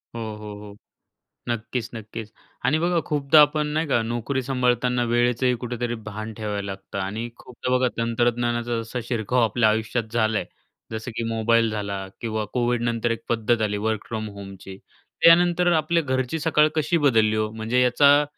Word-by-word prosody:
हो, - - -4 0.2
हो, 105 -1 -8
हो. 105 -1 -11 0.7
नक्कीच, 120 +1 -3
नक्कीच 110 0 -7 0.3
आणि 140 +5 +3
बघा 170 +1 +2
खूपदा 150 +1 +5
आपण 150 +1 +3
नाही 160 0 0
का 120 -4 +2
नोकरी 120 +4 -2
सांभाळताना 125 -1 +1
वेळेचंही 120 +1 +2
कुठेतरी 120 0 -3
भान 110 +1 -6
ठेवायला 105 -2 -4
लागतं. 95 +1 -8
आणि 105 +5 -3
खूपदा 125 0 -7
बघा 125 0 +3
तंत्रज्ञानाचा 120 0 0
जसा 115 +2 -5
शिरकाव 120 +1 0
आपल्या 110 0 +3
आयुष्यात 110 +2 0
झाला 110 -2 +1
आहे, - - -5 0.5
जसं 110 +2 -5
की 115 - -1
मोबाईल 115 0 +3
झाला 100 -2 -3 0.2
किंवा 110 -2 -2
कोविडनंतर 120 -1 0
एक 115 0 -4
पद्धत 115 0 +1
आली 105 -1 0
वर्क 110 -2 -2
फ्रॉम 110 -1 -4
होमची. 95 -1 -10 0.4
त्यानंतर 175 +1 +5
आपल्या 165 +1 +2
घरची 130 +2 -1
सकाळ 155 -1 +3
कशी 160 +2 +2
बदलली 110 -4 +3
ओ? 110 0 0
म्हणजे 110 +3 0
याचा 140 +4 +5
120 Hz, 160 wpm, -24 LUFS, 110-125 Hz, 0.7 s, खूपदा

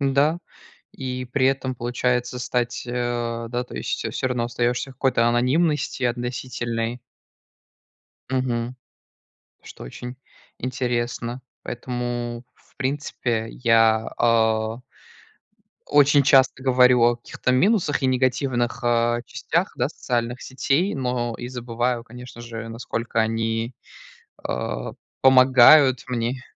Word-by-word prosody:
Н-да. 140 +4 +2 0.5
И 130 -1 -4
при 130 +1 +1
этом 135 -1 0
получается 125 +1 -1
стать, 125 0 -2
а, 120 -1 -2
да, 120 +1 -2
то - - -12
есть, - - -3
э, - - -2
всё 130 - -2
равно 125 -2 -1
остаёшься 120 +2 -1
в - - -14
какой-то 130 -3 +2
анонимности 135 +5 +1
относительной. 120 -1 -3 1.3
Мгм. 125 -1 -1 0.9
Что - - -11
очень 125 - -8 0.4
интересно. 120 -1 -3 0.2
Поэтому 120 -1 -4
в - - -30
принципе 130 -4 -2
я, 115 -2 +3
а 110 -1 +2 1.1
очень 145 0 +5
часто 135 -1 +4
говорю 125 -2 +5
о 120 0 +4
каких-то 125 +1 -3
минусах 170 - +2
и - - +3
негативных, 130 -1 0
а, 120 0 +2
частях, - - -1
да, - - 0
социальных 120 0 -3
сетей, 140 +8 0
но 125 -3 -2
и 120 - -6
забываю, 120 -1 -2
конечно 125 0 -11
же, 115 -1 -7
насколько 115 0 -3
они, 115 +2 -1 0.7
а, - - -3 0.3
помогают 130 +1 +7
мне. 125 +1 -2
125 Hz, 115 wpm, -23 LUFS, 120-130 Hz, 1.3 s, помогают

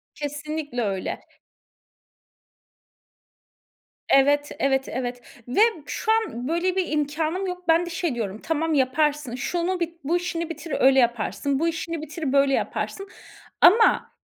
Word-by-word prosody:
Kesinlikle 295 -2 -4
öyle. 195 -4 -2 2.9
Evet, 290 +2 +4
evet, 270 -1 +1
evet 245 0 -4 0.3
ve 245 - -5
b - - +6 0.2
şu 440 - -2
an 440 - 0
böyle 345 +4 0
bir 370 -4 -1
imkânım 310 +5 -1
yok. 360 0 -6
Ben 330 +1 +4
de - - -6
şey 335 -5 -2
diyorum. 215 -3 -4
"Tamam, 325 0 0
yaparsın. 285 -1 +1
Şunu 350 +7 -2
bi 340 0 -3
bu 330 +5 +1
işini 335 -1 -3
bitir, 325 0 -6
öyle 270 +1 +5
yaparsın. 240 +3 0
Bu 330 - +1
işini 330 0 -3
bitir, 310 -2 -4
böyle 275 -1 +4
yaparsın." 390 +7 -2 0.5
Ama 450 +5 +5
300 Hz, 135 wpm, -24 LUFS, 270-335 Hz, 2.9 s, b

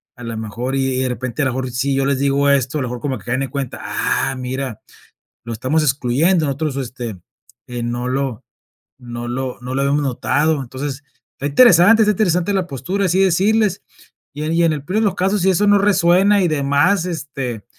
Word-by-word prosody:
a 125 - -12
la 115 -1 -5
mejor 115 +4 -4
y 135 -1 0
de 130 - 0
repente 125 +2 -4
a - - +2
lo 130 - +1
mejor 130 0 -3
si 135 +3 -1
yo 135 0 +1
les 140 -1 0
digo 140 0 +2
esto, 140 +2 +1
a - - -2
lo 125 - -2
mejor 120 0 -6
como 135 -4 -2
que 95 - -16
caen 130 +2 -1
en 135 - -4
cuenta, 135 -2 -5
ah, 135 - -1
mira, 130 -2 -5 0.6
lo 115 - -6
estamos 130 +8 0
excluyendo, 150 +5 +2
nosotros, 140 0 -2
este, 120 -5 -5 0.5
eh, 120 -1 -5
no 120 +1 -3
lo 130 -3 -2 0.6
no 120 -1 -7
lo 130 +1 -4
no 130 +1 -5
lo 135 - 0
habíamos 145 +2 +1
notado. 145 +3 0
Entonces, 135 +2 -6 0.3
está 140 - -3
interesante 205 - +6
está 210 - +3
interesante 180 -2 +1
la 185 -2 0
postura, 185 +8 -2
así 185 +2 +1
decirles, 200 +2 +2 0.5
y 150 - -5
en 160 - -1
y 170 - +3
en 165 - +3
el 145 -1 -6
peor 200 +7 -1
de 220 - +2
los 195 - 0
casos, 195 +3 +1
si 190 - +3
eso 200 +3 +2
no 205 0 +5
resuena 195 0 +3
y 175 - +2
demás, 155 +6 +2
este, 135 - -5
140 Hz, 215 wpm, -19 LUFS, 130-175 Hz, 0.6 s, interesante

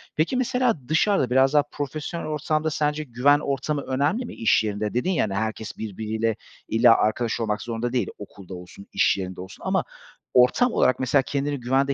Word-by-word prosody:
Peki, 165 +12 +1
mesela 250 -3 +1
dışarıda, 160 - +2
biraz 130 +2 +3
daha 145 -1 +5
profesyonel 150 +3 -5
ortamda 155 +1 -1
sence 150 0 -1
güven 140 +2 +3
ortamı 140 +1 -2
önemli 145 - -1
mi? - - -8
İş 110 -1 +2
yerinde 105 0 -2
dedin 125 +10 0
ya, 180 - +1
hani, 100 - -2
herkes 110 +1 -3
birbiriyle 110 +1 -2 0.3
illa 115 +1 +5
arkadaş 115 +2 0
olmak 110 -2 -1
zorunda 120 +1 -3
değil; 125 - 0
okulda 100 -2 -11
olsun, 90 +2 -11
iş - - +3
yerinde 95 -1 -5
olsun 95 - -11
ama - - +1 0.5
ortam 125 - +4
olarak 130 - +2
mesela 130 +2 +3
kendini 140 +1 -2
güvende 135 +3 +1
130 Hz, 175 wpm, -24 LUFS, 110-150 Hz, 0.5 s, daha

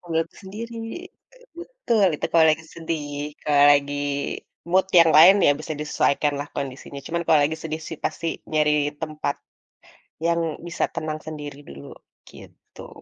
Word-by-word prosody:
Ngambil 165 -2 -1
waktu 165 - -17
sendiri. 230 +4 -7 0.8
Betul, 300 - 0
itu - - -2
kalau 165 -1 +6
lagi 160 +1 -1
sedih, 160 -3 -4 0.3
kalau 145 -1 +4
lagi 145 0 +1 0.7
mood 190 +1 +3
yang 165 -1 +6
lain 185 +5 +9
ya 145 - +6
bisa 155 +1 -5
disesuaikan 150 -1 +1
lah 145 - -6
kondisinya. 140 +1 -6
Cuman, 170 +1 -2
kalau 155 -2 +5
lagi 160 +2 -1
sedih 160 0 -4
sih 160 - -6
pasti 165 +1 -2 0.2
nyari 150 -1 +3 0.3
tempat 155 -1 -3 0.9
yang 170 0 +2 0.3
bisa 170 - -2
tenang 155 -2 -3
sendiri 145 -2 -7
dulu, 70 0 -11 0.4
gitu. - - -14
155 Hz, 150 wpm, -23 LUFS, 145-170 Hz, 0.9 s, lain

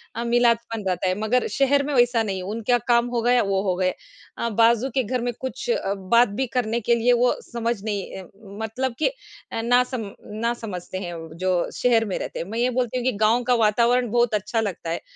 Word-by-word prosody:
अ, 230 - -2
मिलादपन 235 -2 +1
रहता 185 0 0
है। 185 - 0
मगर 230 +4 +1
शहर 280 +1 +3
में 295 - -2
वैसा 245 -2 +3
नहीं 195 -3 -3
है, 185 - -5
उनका 225 +5 0
काम 240 0 +3
हो 240 -1 -1
गया 240 +2 +3
या 245 - +4
वो 195 -1 0
हो 185 -3 0
गए 185 0 0 0.4
अ, 235 - -1
बाजू 230 +3 +3
के 260 - +2
घर 250 +2 -2
में 240 0 -2
कुछ 260 - -5 0.4
बात 235 +1 +6
भी 265 - +2
करने 235 -1 -1
के 235 +2 +2
लिए 235 +1 +3
वो 245 +1 +3
समझ 235 0 -2
नहीं 200 -3 -4
अ, - - -11 0.4
मतलब 250 +3 -2
कि 315 - +3 0.4
अ, 225 - -2
ना 245 +2 +4
सम 240 -5 -5 0.3
ना 235 +1 +2
समझते 190 -6 -6
हैं 180 -2 -5
व 165 -1 -8 0.2
जो 180 -2 +1
शहर 230 -2 +3
में 195 - -3
रहते - - -5
हैं। - - -3
मैं 225 +2 -3
ये 245 +1 +2
बोलती 250 0 -1
हूँ 250 - -2
कि 255 - +3
गाँव 220 +3 +3
का 250 +1 +2
वातावरण 235 +2 +3
बहुत 240 -1 +2
अच्छा 210 +2 0
लगता 190 -5 -4
है, 165 - -2
235 Hz, 235 wpm, -23 LUFS, 210-245 Hz, 0.4 s, बात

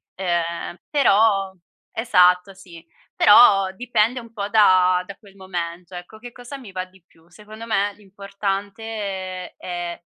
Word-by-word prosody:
Ehm, 175 -2 -3
però 205 -8 +3 0.4
esatto 180 -4 +3
sì, 175 -3 -15 0.3
però 200 -3 +6
dipende 240 +2 0
un 230 -1 -15
po' 205 -3 -4
da 185 -4 +4
da 200 - -10
quel 200 -3 -20
momento 180 -1 -6
ecco, 180 +5 -11
che 245 +1 -10
cosa 245 +4 -10
mi 245 -7 -12
va 185 -1 -4
di 185 -1 -24
più. 165 0 -27
Secondo 215 +4 -12
me 205 -2 0
l'importante 200 -1 -5
è 175 -1 -6
195 Hz, 135 wpm, -21 LUFS, 180-215 Hz, 0.4 s, però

